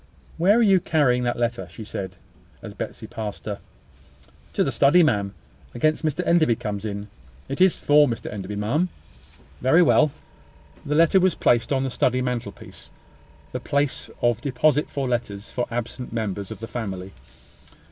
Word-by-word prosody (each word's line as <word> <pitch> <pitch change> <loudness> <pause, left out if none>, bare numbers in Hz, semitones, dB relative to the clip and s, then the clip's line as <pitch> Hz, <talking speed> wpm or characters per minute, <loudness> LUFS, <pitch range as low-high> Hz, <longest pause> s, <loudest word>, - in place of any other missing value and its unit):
"Where 195 +6 +5
are 240 - +4
you 195 -3 +5
carrying 145 -8 +2
that 120 - 0
letter?" 120 0 -1
said 100 -4 -6
she, - - -27 0.5
as - - -7
Betsy - - -6
passed 110 -4 -6
her. 105 -2 -4 0.9
"To - - +2
the - - -1
study, 155 +6 +5
ma'am, 100 -9 +1 0.4
against 155 +6 +1
Mr 155 +3 -1
Enderby 160 -8 +4
comes 105 -1 -4
in. 100 -1 -4 0.4
It 140 +5 -4
is 185 -1 +5
for 145 0 +5
Mr 115 -3 -4
Enderby, 100 0 -5
ma'am." 130 - 0 0.7
"Very 160 +8 +5
well." 155 -2 +4 0.8
The 150 - 0
letter 165 +4 +5
was 185 -3 +2
placed 120 +2 +2
on 135 -1 +2
the 135 - -2
study 125 +1 +1
mantelpiece; 125 -5 -5 0.6
the - - -3
place 140 -1 -1
of 120 -1 +2
deposit 150 +3 +1
for 140 -2 -2
letters 115 -4 -3
for 125 - -2
absent 120 +1 -5
members 105 -4 -3
of - - -8
the 115 - -5
family. 95 -6 -5
125 Hz, 165 wpm, -24 LUFS, 105-150 Hz, 0.9 s, Where